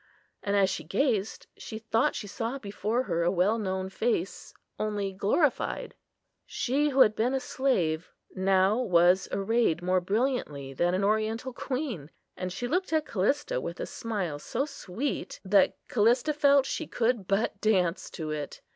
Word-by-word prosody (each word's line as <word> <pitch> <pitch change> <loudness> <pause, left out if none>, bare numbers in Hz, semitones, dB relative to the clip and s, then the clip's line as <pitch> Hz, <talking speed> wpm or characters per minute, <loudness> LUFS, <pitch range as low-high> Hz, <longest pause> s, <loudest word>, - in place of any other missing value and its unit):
And 200 0 -1
as 195 -1 +4
she - - -4
gazed, 210 - 0
she 220 - -7
thought 225 +5 +1
she - - -4
saw 230 +5 -3
before 215 +1 -2
her 170 -8 -1
a 170 - +3
well 195 +5 +2
known 190 -2 -2
face, 195 -1 -2 0.3
only 205 -2 -2
glorified. 205 - 0 0.5
She, 285 +4 0
who 270 -1 +3
had 215 -3 +6
been 245 +4 +1
a - - +1
slave, 180 -13 0 0.2
now 190 +3 +3
was 180 -4 +4
arrayed 195 -4 +1
more 185 0 +2
brilliantly 190 - -1
than 175 +6 +1
an 190 - 0
oriental 220 +4 0
queen; 250 - -4 0.3
and 185 0 -4
she 220 +7 -3
looked 365 +7 -1
at 315 -1 +2
Callista 290 - 0
with - - -6
a - - -2
smile 195 - -4
so 250 - -2
sweet, 275 -2 -4
that 195 0 +4
Callista 240 +6 +3
felt 280 -2 +4
she 310 +3 -3
could 230 -5 0
but 200 0 0
dance 185 -5 +1
to 155 -2 -5
it. 150 -2 -5
215 Hz, 160 wpm, -28 LUFS, 185-255 Hz, 0.5 s, had